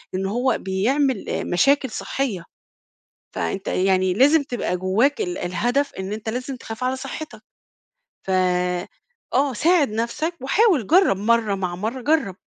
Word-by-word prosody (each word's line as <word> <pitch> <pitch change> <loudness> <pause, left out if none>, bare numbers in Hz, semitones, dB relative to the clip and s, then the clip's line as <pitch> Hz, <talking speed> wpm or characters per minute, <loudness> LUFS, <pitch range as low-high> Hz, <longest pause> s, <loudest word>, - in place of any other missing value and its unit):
إن 190 +1 -1
هو 245 +6 +1
بيعمل 240 +6 0 0.2
مشاكل 275 +9 +2
صحيّة، 195 -3 -3 0.9
فأنت 195 0 -3
يعني 185 0 +2
لازم 285 - +4
تبقى 245 -9 -2
جوّاك 210 +10 +1
ال 180 0 -2
الهدف 245 +11 -1
إن 190 +2 -4
أنت 220 +1 -5
لازم 255 +3 -4
تخاف 225 0 -7
على 255 +1 0
صحتك، 270 +4 -7 0.8
ف - - -10 1.0
آه، 270 +1 +2
ساعد 320 +3 +3
نفسَك، 235 +10 -2
وحاول 290 - +2
جرّب 365 - +4
مَرّة 220 0 +2
مع 180 -2 -3
مَرّة 220 +8 -4
جرَب، 270 - +1
240 Hz, 135 wpm, -22 LUFS, 195-275 Hz, 1.0 s, لازم